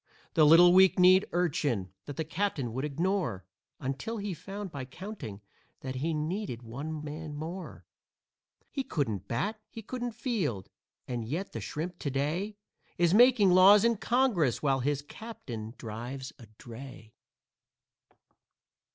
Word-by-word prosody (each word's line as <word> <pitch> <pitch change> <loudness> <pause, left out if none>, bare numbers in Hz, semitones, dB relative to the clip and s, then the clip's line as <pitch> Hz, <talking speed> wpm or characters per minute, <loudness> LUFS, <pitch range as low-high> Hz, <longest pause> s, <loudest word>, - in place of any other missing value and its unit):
The 155 - +5
little 175 +3 +8
weak 190 0 +6
kneed 185 +2 +6
urchin 145 - 0
that 145 - -7
the 160 - 0
captain 155 - -2
would 130 +3 -3
ignore 160 - -1 0.3
Until 135 - -3
he 205 -2 -3
found 195 +4 -7
by 140 -4 -5
counting, 130 - -8 0.4
that 130 -1 -5
he 155 +6 -1
needed 155 - -3
one 150 +7 -6
man 150 0 -6
more. 165 +5 -7 0.9
He 270 - -2
couldn't 110 - -2
bat, 205 - -2
he 225 - -9
couldn't 245 +1 -4
field, 195 - -2 0.4
and 120 -2 -3
yet 160 - -4
that - - -5
shrimp 170 +3 -5
to 140 - -2
day 160 +10 -2 0.4
Is 175 0 +3
making 235 -3 +6
laws 195 +4 +7
in 235 0 +4
Congress, 215 - +1
while 135 -2 +2
his 145 +2 -1
captain 125 - -8
drives 120 +4 -6
a 115 - -13
dray. 120 -2 -11
155 Hz, 140 wpm, -30 LUFS, 130-195 Hz, 0.9 s, little